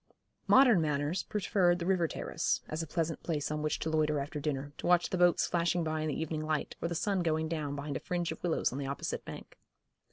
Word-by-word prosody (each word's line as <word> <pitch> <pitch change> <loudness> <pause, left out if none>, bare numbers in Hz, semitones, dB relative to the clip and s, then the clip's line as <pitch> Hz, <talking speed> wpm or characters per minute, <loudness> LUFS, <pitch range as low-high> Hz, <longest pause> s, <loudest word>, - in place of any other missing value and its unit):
Modern 250 -9 +6
manners 150 +3 0
preferred 185 -3 +1
the 170 - -4
river 180 -3 +2
terrace, - - -1
as 155 +2 -3
a 165 - -5
pleasant 165 0 -2
place 150 -3 -2
on 150 0 -2
which 155 0 0
to 160 - -3
loiter 150 -1 +2
after 145 +2 -4
dinner, 145 -1 -3
to - - -3
watch 175 -1 +3
the 185 - 0
boats 175 -1 +4
flashing 175 0 +1
by 155 -1 -1
in 155 - -1
the 150 - -2
evening 160 -1 -2
light, 155 -1 -2
or - - 0
the 170 - -3
sun 195 +3 0
going 160 -2 0
down 155 -3 -3
behind 145 0 -4
a - - -1
fringe 175 -1 -2
of - - -7
willows 175 -3 +1
on 135 - -4
the 140 - -3
opposite 140 - -3
bank. - - -10
160 Hz, 235 wpm, -31 LUFS, 150-175 Hz, -, Modern